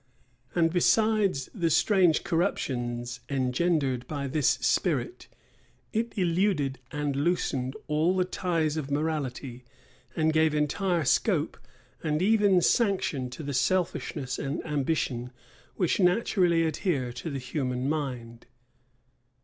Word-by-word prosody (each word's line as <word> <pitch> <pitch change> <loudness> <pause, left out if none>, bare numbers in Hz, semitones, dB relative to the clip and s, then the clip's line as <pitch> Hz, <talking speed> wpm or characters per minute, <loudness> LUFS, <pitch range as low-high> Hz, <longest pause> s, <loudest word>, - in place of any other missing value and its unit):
And 165 -1 +2
besides 205 - +2
the 170 -6 0
strange 180 -1 +3
corruptions 120 -7 -2
engendered 135 -1 0
by 145 -2 -4
this 140 +1 0
spirit, - - 0 0.7
it 230 +1 -2
eluded 170 -7 +1
and 145 -1 -2
loosened 140 -4 -1
all 155 +4 +1
the 185 - +2
ties 165 -4 -1
of 145 -3 -4
morality, 140 -4 -3 0.5
and 160 -1 +2
gave 155 -1 +3
entire 165 +3 0
scope, - - +1 0.5
and 150 -1 0
even 200 -1 +4
sanction, 185 - +1
to 130 +5 -8
the 140 0 -4
selfishness 135 -2 -1
and 140 0 -3
ambition 140 -4 -1 0.5
which 180 0 +1
naturally 180 -3 +3
adhere 150 -6 -1
to 125 +7 -6
the 140 - -4
human 130 -1 -2
mind. 125 -6 -4
155 Hz, 115 wpm, -27 LUFS, 130-180 Hz, 0.7 s, even